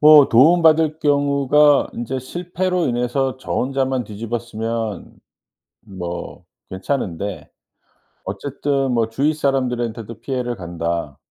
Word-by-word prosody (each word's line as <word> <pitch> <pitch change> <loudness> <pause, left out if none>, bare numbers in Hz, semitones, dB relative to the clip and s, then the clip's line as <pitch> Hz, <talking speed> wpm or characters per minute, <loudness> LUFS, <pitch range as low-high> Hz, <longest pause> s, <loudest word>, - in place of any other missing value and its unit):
뭐 150 -2 +8
도움 160 +9 +5
받을 160 -1 +4
경우가 145 -1 +3
인제 125 +3 -3
실패로 175 +5 -2
인해서 125 +2 -1
저 - - -6
혼자만 130 -1 0
뒤집어쓰면 115 -1 -4 0.7
뭐 90 -3 -7 0.3
괜찮은데 95 - -3 0.8
어쨌든 135 +6 -2
뭐 115 -1 +1
주위 140 +7 +1
사람들한테도 120 -6 -2
피해를 125 -2 -3
간다 85 -5 -4
125 Hz, 250 characters per minute, -20 LUFS, 110-145 Hz, 0.8 s, 뭐